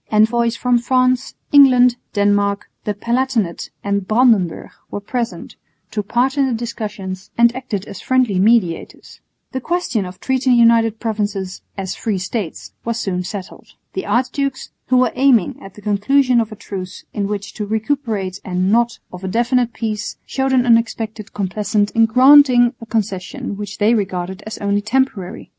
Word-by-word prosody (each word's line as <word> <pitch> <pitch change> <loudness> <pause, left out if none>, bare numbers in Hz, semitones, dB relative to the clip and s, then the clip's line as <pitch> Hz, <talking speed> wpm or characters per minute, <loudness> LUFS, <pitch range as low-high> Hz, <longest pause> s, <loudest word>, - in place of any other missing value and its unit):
Envoys 230 +2 +3
from 245 0 +2
France, 255 +1 +1 0.2
England, 250 -4 +6 0.2
Denmark, 205 0 +1 0.2
the 210 - -1
Palatinate 235 -4 -1
and 200 -1 -1
Brandenburg 220 -7 +2 0.2
were - - -4
present, 235 +3 -4 0.4
took 210 -2 -3
part 265 +5 +1
in 275 - +3
the 250 - -1
discussions, 210 -4 -6
and 235 0 +4
acted 230 -7 -4
as 195 - -9
friendly 255 -7 +1
mediators. 200 -5 0 0.3
The 260 - -4
question 330 - -1
of 180 0 -9
treating 260 -1 +1
the - - +4
United 230 -1 +4
Provinces 205 -4 -3 0.2
"as 190 -1 -3
free 215 -4 -2
States" 190 -1 -5
was 235 0 -2
soon 180 -4 -2
settled. 190 0 -8 0.2
The 190 - -4
archdukes, 260 +5 -1 0.2
who 255 - +3
were 250 -2 +3
aiming 255 -7 +2
at 195 - -12
the 210 - -14
conclusion 240 +5 +3
of 220 - -4
a - - -7
truce 185 -2 -7
in 200 -1 -1
which 205 0 -5
to 210 -1 -5
recuperate 220 -4 -2
and 185 +1 0
not 235 +1 +2 0.2
of 180 +1 -9
a - - -3
definitive 240 +4 +1
peace, 215 -2 -3
showed 265 0 -1
an 255 -2 +3
unexpected 225 -2 0
complaisance 205 +1 -1
in 225 0 +4
granting 255 0 +6
a 230 - -9
concession 220 +3 -3
which 205 -1 -7
they 215 +2 +3
regarded 190 -2 -2
as 215 - -6
only 205 0 0
temporary. 210 -5 -2
220 Hz, 160 wpm, -19 LUFS, 200-245 Hz, 0.4 s, England